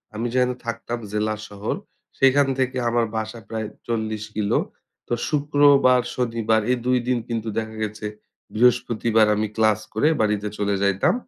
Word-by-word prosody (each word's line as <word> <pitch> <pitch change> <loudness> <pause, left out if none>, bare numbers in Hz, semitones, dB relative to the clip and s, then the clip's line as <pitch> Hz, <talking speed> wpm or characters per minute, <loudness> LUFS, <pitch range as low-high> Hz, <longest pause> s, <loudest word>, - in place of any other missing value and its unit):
আমি 115 +2 -2
যেহেনে 125 -1 +2
থাকতাম 120 0 -4
জেলা 110 0 0
শহর 100 +1 -4 0.4
সেইখান 135 +1 +5
থেকে 130 0 0
আমার 120 0 +2
বাসা 110 +1 -4
প্রায় 110 -1 -3 0.2
৪০ 110 -2 -2
কিলো। 105 -2 +1 0.5
তো - - -2 0.2
শুক্রবার, 145 -3 +4
শনিবার 115 -3 +1
এই 125 - +2
২ 125 0 +3
দিন 125 -1 +2
কিন্তু 115 -1 -3
দেখা 110 0 -6
গেছে 105 0 -5 0.5
বৃহস্পতিবার 115 -1 +3
আমি 110 +1 0
ক্লাস 110 -1 +3
করে 110 +8 +2
বাড়িতে 105 -1 0
চলে 100 -1 0
যাইতাম। 100 - +2
115 Hz, 150 wpm, -23 LUFS, 110-125 Hz, 0.5 s, সেইখান